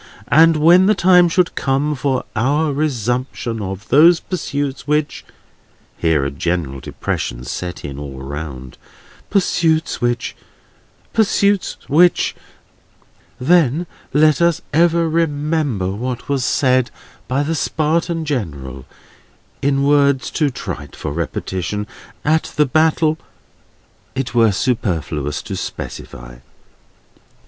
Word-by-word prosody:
And 160 Hz, +1 st, +6 dB
when 175 Hz, +5 st, +6 dB
the 215 Hz, -, +4 dB
time 180 Hz, -2 st, +5 dB
should 180 Hz, +1 st, +1 dB
come 140 Hz, +2 st, 0 dB
for 135 Hz, -2 st, -1 dB
our 145 Hz, +6 st, +1 dB
resumption 125 Hz, -4 st, -2 dB
of 95 Hz, +1 st, -6 dB
those 165 Hz, +4 st, +6 dB
pursuits 145 Hz, -7 st, -4 dB
which 150 Hz, 0 st, 0 dB, 0.7 s
(here 80 Hz, -4 st, +1 dB
a 70 Hz, -, -2 dB
general 75 Hz, -2 st, -2 dB
depression -, -, -4 dB
set 90 Hz, +8 st, -5 dB
in 70 Hz, -1 st, -6 dB
all 70 Hz, -2 st, -7 dB
round), 70 Hz, -2 st, -7 dB, 0.5 s
pursuits 165 Hz, -4 st, +1 dB
which, 120 Hz, 0 st, -1 dB, 0.8 s
pursuits 205 Hz, -2 st, +2 dB
which;—then 165 Hz, -1 st, 0 dB, 0.3 s
let 155 Hz, +2 st, +3 dB
us 170 Hz, 0 st, +2 dB
ever 170 Hz, +1 st, +3 dB
remember 150 Hz, -, 0 dB
what 125 Hz, +4 st, -4 dB
was 140 Hz, -3 st, 0 dB
said 130 Hz, -1 st, +2 dB, 0.4 s
by 135 Hz, +3 st, 0 dB
the 160 Hz, +3 st, -1 dB
Spartan 160 Hz, +3 st, 0 dB
General, 70 Hz, -, -4 dB, 0.7 s
in 140 Hz, 0 st, +1 dB
words 140 Hz, -2 st, +3 dB
too 150 Hz, -3 st, +1 dB
trite 95 Hz, -, -7 dB
for 75 Hz, -, -5 dB
repetition, 90 Hz, +5 st, -3 dB, 0.4 s
at 155 Hz, +2 st, +2 dB
the 150 Hz, -, +4 dB
battle 155 Hz, +2 st, +2 dB, 1.0 s
it 130 Hz, -1 st, -3 dB
were 115 Hz, -3 st, +4 dB
superfluous 80 Hz, -, -2 dB
to -, -, -5 dB
specify. -, -, -7 dB
135 Hz, 110 wpm, -18 LUFS, 95-160 Hz, 1.0 s, And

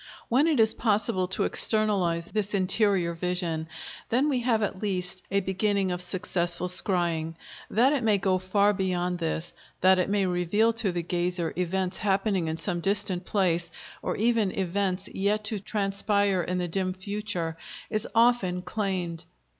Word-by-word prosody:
When 270 Hz, +7 st, +4 dB
it 305 Hz, -6 st, +2 dB
is 220 Hz, 0 st, +5 dB
possible 210 Hz, -4 st, +1 dB
to 190 Hz, -, -1 dB
externalize 195 Hz, -6 st, +1 dB
this 210 Hz, +1 st, -2 dB
interior 190 Hz, -2 st, +2 dB
vision, 170 Hz, -2 st, -2 dB, 0.4 s
then 260 Hz, +6 st, +2 dB
we 265 Hz, -3 st, +1 dB
have 230 Hz, -3 st, +1 dB
at 190 Hz, -2 st, -3 dB
least 185 Hz, -3 st, -2 dB
a 200 Hz, +1 st, +1 dB
beginning 190 Hz, 0 st, 0 dB
of 180 Hz, 0 st, -3 dB
successful 175 Hz, -1 st, -2 dB
scrying. 175 Hz, -3 st, 0 dB, 0.3 s
That 250 Hz, +7 st, +4 dB
it 280 Hz, -, 0 dB
may 215 Hz, -2 st, +3 dB
go 190 Hz, -1 st, +1 dB
far 200 Hz, +2 st, +2 dB
beyond 180 Hz, -2 st, -1 dB
this, 165 Hz, 0 st, -3 dB, 0.3 s
that 185 Hz, 0 st, +5 dB
it 180 Hz, -, +1 dB
may 200 Hz, -1 st, +2 dB
reveal 185 Hz, +6 st, +2 dB
to 225 Hz, -4 st, +1 dB
the 175 Hz, -1 st, -2 dB
gazer 175 Hz, 0 st, -1 dB
events 180 Hz, +1 st, -1 dB
happening 195 Hz, -3 st, +1 dB
in 160 Hz, 0 st, -2 dB
some 175 Hz, 0 st, -2 dB
distant 195 Hz, -1 st, 0 dB
place, 175 Hz, -5 st, +1 dB, 0.3 s
or -, -, -2 dB
even 225 Hz, -2 st, +2 dB
events 190 Hz, 0 st, -1 dB
yet 205 Hz, +2 st, 0 dB
to 215 Hz, -1 st, -2 dB
transpire 200 Hz, -1 st, +1 dB
in 180 Hz, +1 st, -2 dB
the 180 Hz, -1 st, -1 dB
dim 185 Hz, +2 st, -1 dB
future, 190 Hz, -4 st, -3 dB, 0.4 s
is 215 Hz, -1 st, -1 dB
often 225 Hz, -7 st, +3 dB
claimed. 185 Hz, -6 st, -3 dB
190 Hz, 160 wpm, -27 LUFS, 180-210 Hz, 0.4 s, is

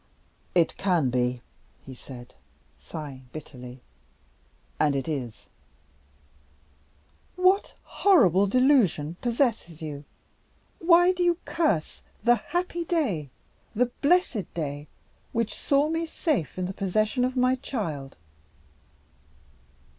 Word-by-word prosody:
"It 170 Hz, -2 st, +3 dB
can 175 Hz, -9 st, +1 dB
be," 125 Hz, -1 st, 0 dB, 0.4 s
he 135 Hz, -, -9 dB
said, 125 Hz, -1 st, -11 dB, 0.5 s
sighing 135 Hz, -5 st, -9 dB
bitterly; 125 Hz, -4 st, -10 dB, 1.0 s
"and 145 Hz, -2 st, +3 dB
it 135 Hz, -2 st, -2 dB
is." 130 Hz, -8 st, -5 dB, 1.9 s
"What 370 Hz, +2 st, +2 dB
horrible 200 Hz, -, +4 dB
delusion 205 Hz, -, +3 dB
possesses 230 Hz, -, 0 dB
you? 150 Hz, -3 st, -6 dB, 0.8 s
Why 350 Hz, +1 st, +6 dB
do 365 Hz, -1 st, -3 dB
you 345 Hz, -1 st, +3 dB
curse 310 Hz, -, 0 dB, 0.2 s
the 240 Hz, +2 st, +6 dB
happy 350 Hz, -, -3 dB
day, 245 Hz, -, -1 dB, 0.5 s
the 245 Hz, +2 st, +1 dB
blessed 285 Hz, -, +2 dB
day, 145 Hz, -2 st, -4 dB, 0.5 s
which 230 Hz, -1 st, 0 dB
saw 285 Hz, +1 st, +2 dB
me 325 Hz, +1 st, -1 dB
safe 285 Hz, -, -1 dB
in 185 Hz, -, -1 dB
the 185 Hz, -, -4 dB
possession 215 Hz, +6 st, 0 dB
of 255 Hz, +1 st, -1 dB
my 255 Hz, 0 st, +4 dB
child?" 165 Hz, -, -4 dB
200 Hz, 105 wpm, -26 LUFS, -, 1.9 s, Why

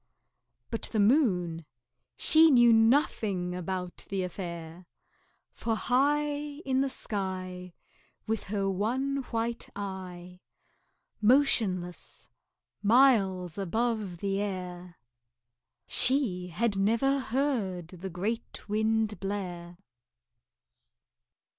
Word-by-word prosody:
But 230 Hz, -, -2 dB
the 220 Hz, -, 0 dB
Moon, 190 Hz, -, +2 dB, 0.5 s
she 320 Hz, 0 st, +6 dB
knew 240 Hz, -4 st, +6 dB
nothing 225 Hz, -6 st, +2 dB
about 180 Hz, 0 st, -5 dB
the 195 Hz, -1 st, -1 dB
affair, 170 Hz, -1 st, -7 dB, 0.7 s
For 225 Hz, -1 st, -2 dB
high 280 Hz, +6 st, +2 dB, 0.4 s
In 265 Hz, 0 st, +1 dB
the 275 Hz, -, 0 dB
sky, 185 Hz, -5 st, -5 dB, 0.5 s
With 225 Hz, -1 st, -2 dB
her 200 Hz, -1 st, -1 dB
one 245 Hz, +9 st, -1 dB
white 230 Hz, 0 st, -3 dB
eye, 185 Hz, -3 st, -7 dB, 0.8 s
Motionless, 210 Hz, -8 st, +1 dB, 0.5 s
miles 200 Hz, -, +3 dB
above 215 Hz, -1 st, -1 dB
the 195 Hz, +2 st, -1 dB
air, 180 Hz, -3 st, -5 dB, 0.9 s
She 230 Hz, -10 st, +2 dB
had 205 Hz, +5 st, -1 dB
never 230 Hz, +8 st, +2 dB
heard 225 Hz, -, -1 dB
the 185 Hz, +1 st, -7 dB
great 205 Hz, +8 st, -4 dB
Wind 220 Hz, -1 st, 0 dB
blare. 180 Hz, -3 st, -5 dB
200 Hz, 90 wpm, -29 LUFS, 180-235 Hz, 0.9 s, she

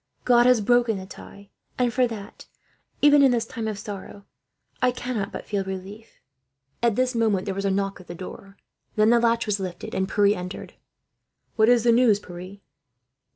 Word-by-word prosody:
God 240 Hz, -1 st, +5 dB
has 250 Hz, -3 st, +4 dB
broken 240 Hz, 0 st, +2 dB
the 190 Hz, -, -7 dB
tie, 200 Hz, +1 st, -13 dB, 0.3 s
and 245 Hz, -2 st, +1 dB
for 255 Hz, 0 st, +3 dB
that, 215 Hz, -2 st, -9 dB, 0.6 s
even 290 Hz, 0 st, +7 dB
in 275 Hz, -, +6 dB
this 235 Hz, -2 st, 0 dB
time 225 Hz, -1 st, -5 dB
of 215 Hz, -2 st, -3 dB
sorrow, 200 Hz, 0 st, -9 dB, 0.6 s
I 255 Hz, -, +4 dB
cannot 245 Hz, -5 st, -3 dB
but -, -, -7 dB
feel 200 Hz, -2 st, -2 dB
relief." 190 Hz, +4 st, -9 dB, 0.6 s
At 235 Hz, -3 st, +2 dB
this 255 Hz, +1 st, +1 dB
moment 220 Hz, -5 st, +1 dB
there 195 Hz, -, -2 dB
was 195 Hz, +1 st, -4 dB
a -, -, +2 dB
knock 195 Hz, 0 st, -2 dB
at 180 Hz, -, -18 dB
the 175 Hz, -, -7 dB
door. 195 Hz, +2 st, -10 dB, 0.4 s
Then 215 Hz, +1 st, +4 dB
the 240 Hz, -, +5 dB
latch 230 Hz, 0 st, +1 dB
was 205 Hz, -1 st, -1 dB
lifted, 180 Hz, -2 st, -6 dB
and 190 Hz, 0 st, -1 dB
Pierre 205 Hz, 0 st, +3 dB
entered. 180 Hz, 0 st, -7 dB, 0.8 s
"What 220 Hz, 0 st, +4 dB
is 240 Hz, -2 st, +4 dB
the 240 Hz, -, +4 dB
news, 230 Hz, -3 st, +4 dB
Pierre?" 180 Hz, +1 st, -10 dB
215 Hz, 190 wpm, -24 LUFS, 195-240 Hz, 0.8 s, even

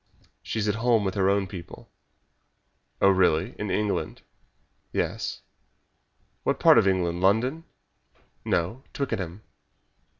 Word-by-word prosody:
"She -, -, -5 dB
is 105 Hz, -1 st, 0 dB
at 105 Hz, -, +2 dB
home 115 Hz, -3 st, +3 dB
with 95 Hz, -1 st, -1 dB
her 95 Hz, -1 st, +2 dB
own 100 Hz, 0 st, +2 dB
people." 90 Hz, -2 st, -10 dB, 1.1 s
"Oh, 100 Hz, -, +5 dB
really 95 Hz, +2 st, +2 dB
in 105 Hz, -, -3 dB
England?" 105 Hz, 0 st, -2 dB, 0.7 s
"Yes." -, -, -3 dB, 1.0 s
"What -, -, -1 dB
part -, -, +7 dB
of -, -, +2 dB
England 90 Hz, -2 st, 0 dB
London?" 125 Hz, -, +2 dB, 0.8 s
"No, 90 Hz, +10 st, -1 dB
Twickenham." 105 Hz, -8 st, -4 dB
100 Hz, 120 wpm, -26 LUFS, 95-110 Hz, 1.1 s, part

